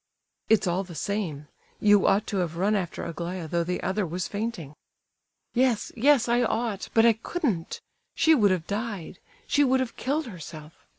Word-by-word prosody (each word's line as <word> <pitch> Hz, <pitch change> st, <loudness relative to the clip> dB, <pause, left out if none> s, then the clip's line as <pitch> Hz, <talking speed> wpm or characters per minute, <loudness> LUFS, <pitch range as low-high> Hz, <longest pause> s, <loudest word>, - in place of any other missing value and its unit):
"It's 220 Hz, -1 st, +4 dB
all 180 Hz, +2 st, 0 dB
the 175 Hz, -3 st, -11 dB
same; 165 Hz, -7 st, -3 dB, 0.3 s
you 205 Hz, -1 st, +5 dB
ought 205 Hz, +2 st, +3 dB
to 205 Hz, -, -3 dB
have 170 Hz, -3 st, -2 dB
run 200 Hz, +4 st, +2 dB
after 180 Hz, -5 st, -3 dB
Aglaya 170 Hz, +1 st, -5 dB
though 170 Hz, +2 st, 0 dB
the 180 Hz, +1 st, -3 dB
other 200 Hz, +2 st, 0 dB
was 180 Hz, +1 st, -3 dB
fainting." 200 Hz, -9 st, -4 dB, 0.8 s
"Yes, 245 Hz, -3 st, +1 dB
yes, 260 Hz, 0 st, +4 dB
I 240 Hz, +1 st, +3 dB
ought—but 225 Hz, -1 st, +1 dB
I 230 Hz, -, +7 dB
couldn't! 225 Hz, -, -3 dB, 0.3 s
She 320 Hz, -1 st, +5 dB
would 215 Hz, -9 st, +4 dB
have 180 Hz, -4 st, 0 dB
died—she 205 Hz, -, -3 dB
would 260 Hz, -1 st, +3 dB
have 260 Hz, -3 st, -3 dB
killed 290 Hz, +5 st, -1 dB
herself. 160 Hz, -6 st, -9 dB
205 Hz, 165 wpm, -26 LUFS, 175-235 Hz, 0.8 s, I